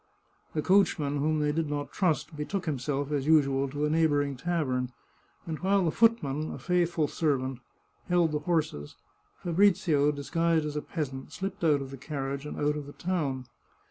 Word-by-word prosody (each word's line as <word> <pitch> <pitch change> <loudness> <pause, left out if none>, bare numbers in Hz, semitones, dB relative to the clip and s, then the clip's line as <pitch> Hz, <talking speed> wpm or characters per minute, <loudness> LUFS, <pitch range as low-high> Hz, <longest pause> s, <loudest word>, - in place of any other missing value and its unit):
The 155 - 0
coachman, 165 -7 +3
whom 155 +1 +1
they 150 0 +2
did 160 0 -1
not 145 -1 -3
trust, 160 -4 0
betook 175 +6 -3
himself, 140 -1 -2
as 145 -1 -1
usual, 140 -3 +3
to 145 +2 -1
a - - +1
neighbouring 145 -3 +2
tavern, 130 -5 -1 0.5
and 160 -2 -4
while 195 0 +2
the 160 - +2
footman, 155 -10 +2
a - - -6
faithful 175 -3 +1
servant, 135 -5 -1 0.5
held 175 -2 +3
the 150 - 0
horses, 155 - -1 0.5
Fabrizio, 170 -5 +3
disguised 165 +2 0
as 150 -1 -4
a 150 - -1
peasant, 135 -6 -5
slipped 195 -1 -5
out 150 -4 +3
of 135 - -9
the 135 - -7
carriage 140 0 -4
and - - -6
out 150 0 +1
of 145 -2 -6
the 145 - -10
town. 145 -8 -2
150 Hz, 175 wpm, -29 LUFS, 140-170 Hz, 0.5 s, coachman